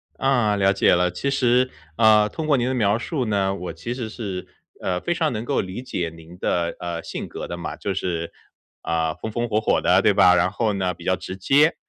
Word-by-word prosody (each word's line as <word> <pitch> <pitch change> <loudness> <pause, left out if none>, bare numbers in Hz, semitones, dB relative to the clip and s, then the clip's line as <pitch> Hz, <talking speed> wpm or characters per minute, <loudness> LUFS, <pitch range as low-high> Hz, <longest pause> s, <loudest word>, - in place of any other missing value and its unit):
啊， 125 -6 +2
了 100 0 +3
解 95 - +4
了。 90 0 +2
其 115 +10 -2
实， 125 -1 +3 0.3
呃， 110 -1 +6
通 160 -1 -5
过 145 -3 +4
您 120 +1 0
的 130 - 0
描 105 -3 +2
述 130 +1 -2
呢， 100 -3 +1
我 90 -3 -5
其 100 +9 -5
实 120 -3 -5
是， 100 -5 -5 0.3
呃， 90 -1 -1
非 175 - -1
常 160 -4 0
能 110 +1 -4
够 140 - +1
理 95 +6 -6
解 85 -9 -3
您 85 +2 -13
的， 85 -2 0
呃， 85 -1 -4
性 - - -5
格 - - -7
的 - - -5
嘛， 85 - -5
就 100 - -3
是， 85 -2 -3 0.5
呃， 80 -1 0
风 110 - -6
风 120 +2 -1
火 110 -1 +1
火 - - +2
的， - - +4
对 - - +4
吧？ 90 - +6
然 90 +1 +3
后 110 -3 0
呢， 95 -2 -1
比 85 0 -13
较 95 - +2
直 95 - -7
接。 145 - +4
100 Hz, 245 characters per minute, -23 LUFS, 90-120 Hz, 0.5 s, 呃